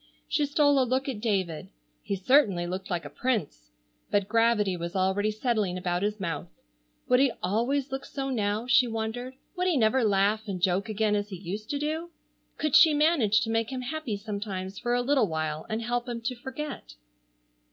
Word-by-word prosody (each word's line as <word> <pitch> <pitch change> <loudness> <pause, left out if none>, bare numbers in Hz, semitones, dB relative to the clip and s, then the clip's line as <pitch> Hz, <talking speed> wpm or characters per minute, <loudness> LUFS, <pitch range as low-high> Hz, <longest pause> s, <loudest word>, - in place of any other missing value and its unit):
She 295 -2 +1
stole 285 -1 +4
a - - +4
look 260 +2 0
at 245 -6 -4
David. 190 -8 -1 0.3
He 200 - -2
certainly 195 -3 +3
looked 185 +2 -5
like 175 -3 -2
a - - -6
prince, 165 - -2 0.4
but 200 -1 +1
gravity 225 -3 +2
was 170 +2 -5
already 190 +2 +1
settling 215 -4 -1
about 180 -1 -1
his 210 +1 -1
mouth. 165 -6 -3 0.6
Would 250 0 +4
he 270 -1 +4
always 250 +8 0
look 270 0 -3
so 270 -1 -4
now, 210 -1 -1
she 250 0 +4
wondered, 230 +3 -4 0.2
would 360 0 0
he 345 -5 +2
never 235 +2 +3
laugh 210 +1 +2
and 190 -3 -3
joke 185 +4 +1
again 215 0 +1
as 205 0 -2
he 195 - -6
used 195 +4 -6
to 290 - -1
do? 310 +4 -3 0.5
Could 305 -3 +1
she 320 -3 +7
manage 290 -9 +3
to 225 - -1
make 225 +1 0
him 260 -1 -3
happy 260 -4 -3
sometimes 200 -2 -5
for 240 0 0
a 245 - +1
little 260 -4 +3
while 155 -2 -3
and 220 +1 -2
help 240 +1 -2
him 235 -1 -3
to 250 +2 -2
forget? 260 - -7
220 Hz, 195 wpm, -27 LUFS, 195-260 Hz, 0.6 s, she